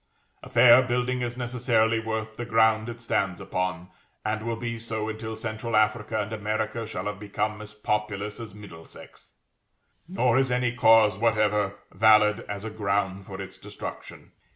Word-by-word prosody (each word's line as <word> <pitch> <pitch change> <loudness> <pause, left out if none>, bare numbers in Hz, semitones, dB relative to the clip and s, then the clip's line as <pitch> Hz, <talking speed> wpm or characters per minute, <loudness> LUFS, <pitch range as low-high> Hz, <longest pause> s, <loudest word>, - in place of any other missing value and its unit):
A - - -11
fair 125 0 +7
building 125 0 -1
is 120 0 -3
necessarily 120 -2 +1
worth 110 0 -4
the 120 - -5
ground 110 -1 +3
it 115 0 -8
stands 100 -5 0
upon, 90 -1 -3 0.4
and 110 0 -1
will 115 0 -2
be 115 0 -4
so 110 -1 -4
until 110 0 -5
central 110 0 -4
Africa 110 +1 +1
and 105 +1 -3
America 110 +1 -2
shall 115 - -5
have 105 -1 -4
become 105 +1 -3
as 105 0 -10
populous 105 0 -2
as 110 -4 -8
Middlesex; 90 -6 -13 0.7
nor 130 -9 +2
is 135 -1 +1
any 125 0 +1
cause 110 -4 +5
whatever 105 -3 +2 0.2
valid 105 -1 +5
as 100 0 -5
a 110 - -4
ground 100 -2 -1
for 95 -1 -8
its 95 -1 -8
destruction. - - -9
110 Hz, 160 wpm, -26 LUFS, 105-115 Hz, 0.7 s, fair